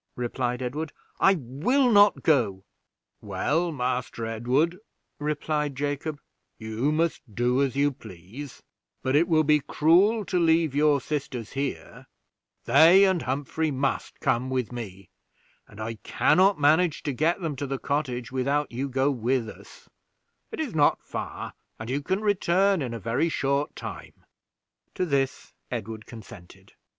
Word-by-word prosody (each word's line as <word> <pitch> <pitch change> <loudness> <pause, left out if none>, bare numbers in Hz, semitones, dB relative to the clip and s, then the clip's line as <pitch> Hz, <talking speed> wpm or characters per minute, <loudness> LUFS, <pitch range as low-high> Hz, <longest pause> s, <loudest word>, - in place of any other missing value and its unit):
replied 125 +1 -2
Edward. 145 +5 -4 0.3
"I 195 - +5
will 175 - +1
not 205 -1 +5
go." 115 -11 +2 0.6
"Well, 165 +4 -1
Master 125 -4 -2
Edward," 130 +10 0 0.4
replied 150 -1 -2
Jacob, 145 +2 -3 0.4
"you 110 +6 -2
must 165 +1 0
do 125 +2 +2
as 135 -3 0
you 145 +1 +2
please; 110 +4 -11 0.4
but 130 +1 +1
it 165 +4 +4
will 160 -3 +3
be 150 0 +4
cruel 190 +10 +3
to 180 - 0
leave 165 -3 +3
your 145 0 +3
sisters 130 -5 -4
here; 140 0 -5 0.6
they 175 +5 +7
and 190 -4 +3
Humphrey 145 +4 -2
must 135 -1 -2
come 125 +1 0
with 130 -3 -2
me, 100 -6 -8 0.6
and 100 - -15
I 110 0 -5
can - - +2
not 190 -1 +4
manage 155 +3 +3
to 145 - -2
get 160 +8 +1
them 160 -4 -3
to 140 - -3
the 135 0 -2
cottage 130 -5 -2
without 140 +3 0
you 130 +4 -3
go 135 +2 +1
with 125 -1 0
us; - - -13 0.6
it - - -7
is - - -3
not - - +3
far, - - -6 0.2
and 110 +2 -6
you 140 +2 -1
can 190 +7 -1
return 195 -2 +2
in 120 -3 -3
a - - -5
very 115 - 0
short 140 -1 -1
time." - - -9 0.7
To 185 - 0
this 140 -4 -1 0.2
Edward 110 -2 -6
consented. 100 -6 -13
140 Hz, 150 wpm, -26 LUFS, 125-160 Hz, 0.7 s, they